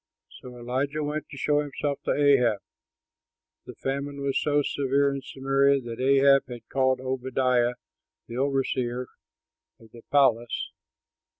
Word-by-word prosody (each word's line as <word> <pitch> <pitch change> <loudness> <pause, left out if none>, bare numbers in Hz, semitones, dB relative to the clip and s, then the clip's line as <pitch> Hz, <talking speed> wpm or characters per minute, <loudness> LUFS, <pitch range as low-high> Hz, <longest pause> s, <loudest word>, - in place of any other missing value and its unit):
So 125 -1 -11
Elijah 135 +5 -2
went 150 +1 -4
to 145 - -10
show 145 +2 +1
himself 145 0 -3
to - - +1
Ahab. 135 -6 +3 1.1
The - - -9
famine 140 +1 -4
was 140 -1 0
so 145 -1 +2
severe 140 0 +1
in 135 - -4
Samaria 135 +1 +1
that 115 -1 -7
Ahab 135 0 +4
had 120 -2 -10
called 130 -1 +1
Obadiah, 130 -1 0 0.5
the 115 - -9
overseer 130 -2 -1 0.7
of 115 -1 -18
the 120 - -13
palace. 120 -5 +2
135 Hz, 130 wpm, -26 LUFS, 125-140 Hz, 1.1 s, Ahab